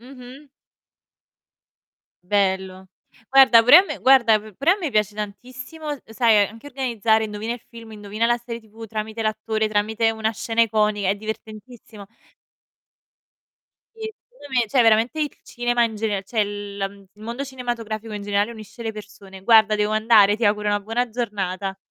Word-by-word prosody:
Mh-mh. 255 +3 -13 1.8
Bello. 190 -1 -1 0.5
Guarda 265 -4 +8
pure 265 +8 +9
a - - +5
me - - -6
guarda 250 -5 +5
p 215 0 -13
pure 280 - +2
a 390 - -1
me 325 -7 -3
piace 210 -2 0
tantissimo, 255 - -7
sai, 220 -3 +3
anche 225 +6 -13
organizzare: 230 -5 0
indovina 215 +2 -4
il 245 - -11
film, 230 -1 -12
indovina 210 +1 -4
la 240 - +2
serie 235 0 -7
tv 220 +1 -12
tramite 220 +1 -5
l'attore, 220 0 -1
tramite 220 +2 +1
una 220 0 -1
scena 225 +1 -2
iconica, 210 -2 +1
è 195 - +2
divertentissimo. 220 0 -9 1.9
Sì, 440 -1 -6 0.2
secondo - - -15
me, 240 -4 +1
cioè 255 -1 +3
veramente 225 +7 +3
il 295 - 0
cinema 240 0 -1
in 220 -1 -3
gener 210 -2 -2
cioè 215 +1 0
la 205 -1 -5
il 195 0 -15
mondo 230 +6 -6
cinematografico 230 -4 -5
in 205 - -5
generale 205 +2 0
unisce 220 +1 -11
le 225 - -3
persone. 200 -2 -12
Guarda 220 0 +5
devo 210 0 0
andare, 215 -2 +4
ti 230 - -2
auguro 210 0 +1
una 205 0 +1
buona 225 +4 -2
giornata. 200 -4 -4
220 Hz, 160 wpm, -22 LUFS, 205-240 Hz, 1.9 s, pure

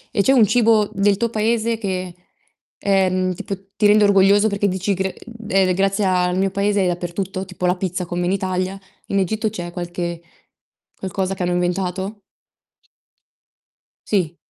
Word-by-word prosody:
E - - +4
c'è 270 - +4
un 235 -5 +6
cibo 220 -1 +3
del 200 0 +3
tuo 235 +4 -1
paese 225 +1 0
che, 185 -4 -3 0.7
ehm, 185 -2 +1
tipo 195 +3 -5 0.2
ti 210 - +4
rende 210 +1 +5
orgoglioso 200 +1 +5
perché 200 0 0
dici: 190 +1 -1
"Gr 190 0 -1 0.4
ehm, 190 -3 +3
grazie 195 +2 +1
al 180 -1 +1
mio 195 0 +1
paese 200 +1 +1
è - - +1
dappertutto", 180 +2 -3
tipo 185 -1 -5
la 180 +1 +2
pizza 180 0 -3
come 175 +1 -2
in 180 - +1
Italia. 185 0 -2 0.3
In 200 - 0
Egitto 215 +4 0
c'è 175 -5 -6
qualche 175 -1 -4 0.8
qualcosa 190 0 -2
che 185 -1 -4
hanno 175 0 0
inventato? 185 +3 -2 1.9
Sì. 175 -5 0
190 Hz, 155 wpm, -20 LUFS, 180-205 Hz, 1.9 s, un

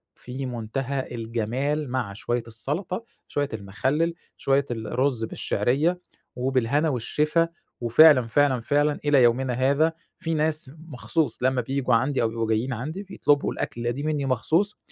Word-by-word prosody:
في 130 +2 -6
منتهى 130 +3 -3
الجمال 120 +6 -2
مع 120 -6 -2
شوية 120 +3 -2
السلطة، 150 - -3 0.2
شوية 145 -1 -1
المخلل، 130 +11 -1 0.2
شوية 135 0 +2
الرز 120 +2 -1
بالشعرية 140 - 0 0.4
وبالهنا 130 +4 +1
والشفا، 150 +6 +1 0.3
وفعلًا، 130 +2 +7
فعلًا، 135 +1 +3
فعلًا 145 +4 +1
إلى 140 -4 +5
يومنا 125 +2 +2
هذا 140 +6 +2 0.2
في 165 -2 -3
ناس 155 -3 0 0.2
مخصوص 135 -2 -1
لمّا 130 -1 +2
بييجوا 135 -1 0
عندي 130 +3 +1
أو 115 - +3
بيبقوا 115 0 -2
جايين 115 +4 0
عندي 155 - -5
بيطلبوا 145 -7 +1
الأكْلة 120 0 -3
دي 135 +4 -5
مني 150 -2 -1
مخصوص 160 - +1
135 Hz, 135 wpm, -25 LUFS, 120-150 Hz, 0.4 s, وفعلًا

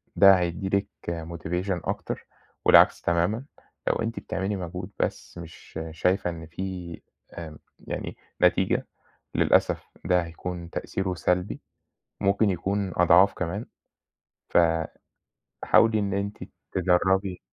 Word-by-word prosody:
ده 95 -2 +8
هيدّي 90 +3 -2
لِك 100 - -3 0.4
motivation 85 +2 -3
أكتر - - -4 0.4
والعكس - - +7
تمامًا، 85 +9 +1 0.4
لو - - +3
أنتِ 115 +1 -2
بتعملي 95 +2 -2
مجهود 90 +1 -6
بس - - -3
مش 80 -1 -9
شايفة 90 +3 +1
إن 80 -1 -7
في 90 0 -6 0.3
آمم 80 -3 -8 0.2
يعني - - -6 0.2
نتيجة، - - +3 0.5
للأسف - - +3 0.2
ده 90 -1 +3
هيكون 85 +1 -6
تأثيره 95 +2 -3
سلبي، 90 +2 -1 0.6
ممكن 100 +2 +3
يكون 95 +1 -1
أضعاف 90 +3 +6
كمان. 95 +6 -3 0.8
ف - - +2 1.1
حاولي 110 -1 +5
إن 100 -1 -1
أنتِ 100 +1 -2 0.4
تجرّبي 95 +1 +2
90 Hz, 115 wpm, -26 LUFS, 85-100 Hz, 1.1 s, ده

